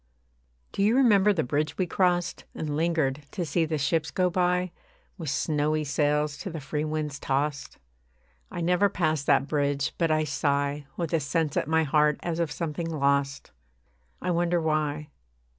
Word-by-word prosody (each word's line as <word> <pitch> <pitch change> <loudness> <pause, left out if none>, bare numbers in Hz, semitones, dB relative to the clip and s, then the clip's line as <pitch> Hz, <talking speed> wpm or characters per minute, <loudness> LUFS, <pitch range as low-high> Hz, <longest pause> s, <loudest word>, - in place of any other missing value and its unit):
Do - - -3
you 215 +4 +4
remember 210 -6 +5
the 175 -6 0
bridge 150 +4 -1
we 185 - +1
crossed, 180 0 0
And 150 -2 -3
lingered 155 -4 0
to 180 -4 -2
see 165 +2 +1
the 155 0 -2
ships 150 +2 0
go 180 +4 +1
by, 180 0 +1 0.5
With 160 -4 -4
snowy 150 +2 0
sails 150 +1 0
to - - -5
the 165 -2 -5
free 150 +2 -3
winds 155 -2 -3
tossed? 140 +1 -2 0.7
I - - -5
never 180 +4 +3
pass 155 -6 0
that 135 - +3
bridge 145 0 0
but 165 -2 +2
I 155 0 +2
sigh 140 -1 -1
With 170 -3 -3
a 165 - +3
sense 155 +1 -1
at - - 0
my 160 0 +3
heart 150 0 +3
as 170 -1 -2
of 165 -3 0
something 165 +1 -3
lost. 140 -2 0 0.7
I 180 - -1
wonder 175 0 +1
why. 155 -1 -1
155 Hz, 170 wpm, -27 LUFS, 145-170 Hz, 0.7 s, remember